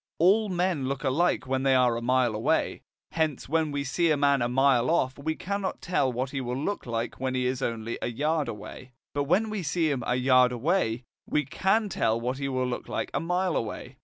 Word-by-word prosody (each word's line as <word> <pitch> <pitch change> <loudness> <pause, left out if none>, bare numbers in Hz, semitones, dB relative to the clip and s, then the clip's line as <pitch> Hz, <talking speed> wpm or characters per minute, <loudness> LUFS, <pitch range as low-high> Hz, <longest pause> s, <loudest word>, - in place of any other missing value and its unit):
All 200 +5 +4
men 175 -6 0
look 135 +1 -3
alike 145 +4 +1
when 130 0 -1
they 135 -1 +3
are 125 -2 +3
a 115 - -3
mile 125 -1 +2
away, 105 +1 0 0.3
hence 160 -4 -1
when 160 +1 +1
we 145 0 -2
see 165 +6 +1
a 155 - +3
man 140 -2 +3
a 120 - +1
mile 130 -1 +3
off 135 -6 +1
we 160 +2 -2
cannot 200 +2 -3
tell 155 -7 0
what 130 +2 -3
he 135 - -3
will 125 0 -3
look 175 +2 -3
like 115 0 -3
when 130 0 -2
he 125 0 0
is 130 +1 -1
only 115 -2 -3
a - - -1
yard 150 +4 0
away. 115 +3 -8 0.2
But 145 -1 -1
when 210 +8 +2
we 215 -2 -2
see 160 0 0
him 130 -4 -2
a 120 - +1
yard 125 0 +4
away, 125 -2 0 0.2
we 150 -1 0
can 195 - +1
tell 115 - 0
what 125 +3 -3
he 140 -1 -2
will 130 -1 0
look 125 -1 -4
like - - -3
a - - 0
mile 180 +1 0
away. 125 +3 -4
135 Hz, 225 wpm, -27 LUFS, 125-165 Hz, 0.3 s, All